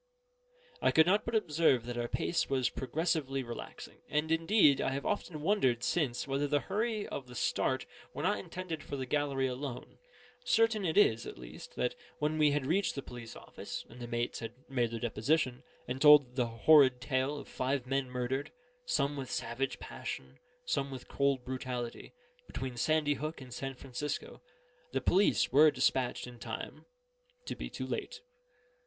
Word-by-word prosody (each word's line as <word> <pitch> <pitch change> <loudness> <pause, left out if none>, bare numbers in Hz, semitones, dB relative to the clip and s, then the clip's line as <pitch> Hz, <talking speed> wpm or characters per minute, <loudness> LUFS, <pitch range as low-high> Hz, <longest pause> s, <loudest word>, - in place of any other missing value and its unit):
I - - +4
could 160 - +6
not 200 +4 +3
but 230 - -2
observe 155 - +3
that 120 0 -4
our 120 0 -1
pace 170 - 0
was 130 -2 +1
progressively 135 -1 -1
relaxing; 120 -1 -8
and 150 +2 0
indeed 165 -3 +4
I - - +1
have 140 - -3
often 180 -7 -2
wondered 130 - +2
since 135 -8 0
whether 140 +2 0
the 145 0 +2
hurry 215 - -1
of 130 - -6
the 125 - -11
start - - 0 0.3
were - - -5
not - - +2
intended 170 - -5
for 145 - -6
the 130 -1 -3
gallery 140 0 0
alone. 130 0 -5 0.4
Certain 225 -4 +3
it 160 +1 0
is 115 - +4
at - - -8
least, - - -11
that 125 - 0 0.2
when 155 +1 0
we 150 -1 +6
had 145 -2 0
reached 180 +7 +1
the 140 - -4
police 120 -2 -9
office, - - -7
and 125 - -13
the 120 - -5
mates 120 0 -2
had 115 0 -6
made 125 -3 0
their 115 0 -4
deposition, 125 +3 0 0.3
and 130 +2 -4
told 150 -4 +7
their 125 -2 +1
horrid 130 +2 +6
tale 130 +3 0
of - - -8
five 130 0 -1
men 135 0 -1
murdered, 125 +3 -2 0.4
some 140 0 +1
with 135 -3 -5
savage 125 +3 -2
passion, 65 - -7 0.3
some 140 - 0
with 130 -2 -8
cold 140 -2 +1
brutality, 125 -2 -4 0.4
between 130 -2 -5
Sandy 150 +4 +2
Hook 155 +2 -4
and 130 -2 -10
San 135 +1 -4
Francisco, 135 +3 -5 0.5
the - - +2
police 195 +3 +3
were 150 +3 +8
despatched 130 -3 +1
in 120 -1 -11
time - - -6 0.6
to - - -4
be - - -6
too - - -5
late. 470 -2 -4
135 Hz, 175 wpm, -32 LUFS, 125-155 Hz, 0.6 s, were